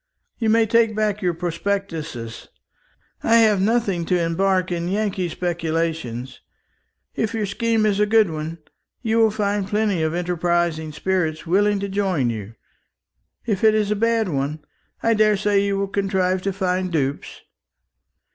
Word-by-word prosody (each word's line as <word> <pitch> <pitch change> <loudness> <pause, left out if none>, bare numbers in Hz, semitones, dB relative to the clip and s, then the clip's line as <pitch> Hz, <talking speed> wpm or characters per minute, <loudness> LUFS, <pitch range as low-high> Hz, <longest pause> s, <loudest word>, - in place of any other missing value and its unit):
You 225 -2 +1
may 225 +1 +4
take 225 0 +2
back 210 -1 0
your 175 -3 0
prospectuses. 165 - -4 0.7
I 230 - +3
have 215 -4 +5
nothing 205 -4 +1
to 180 +1 +1
embark 185 +2 +1
in 170 0 -2
Yankee 195 -2 -1
speculations. 160 -8 -3 0.7
If 220 +1 -1
your 215 -2 0
scheme 225 +2 0
is 205 -1 +1
a 210 - +3
good 215 -4 +4
one, 155 +1 -5 0.5
you 225 0 +1
will 225 -1 +5
find 205 -2 -1
plenty 205 -4 0
of 160 +1 0
enterprising 175 -2 0
spirits 160 -1 -1
willing 200 +4 +2
to 200 - -2
join 190 -11 0
you; 110 0 -7 0.9
if 210 -4 -1
it 215 -1 +5
is 210 -1 +1
a - - +2
bad 230 0 +1
one, 150 0 -3 0.4
I 230 - +3
daresay 210 -2 +3
you 200 -1 0
will 200 0 -1
contrive 190 -2 0
to 195 - -1
find 185 -1 -1
dupes. 140 -4 -2
190 Hz, 150 wpm, -22 LUFS, 165-210 Hz, 0.9 s, have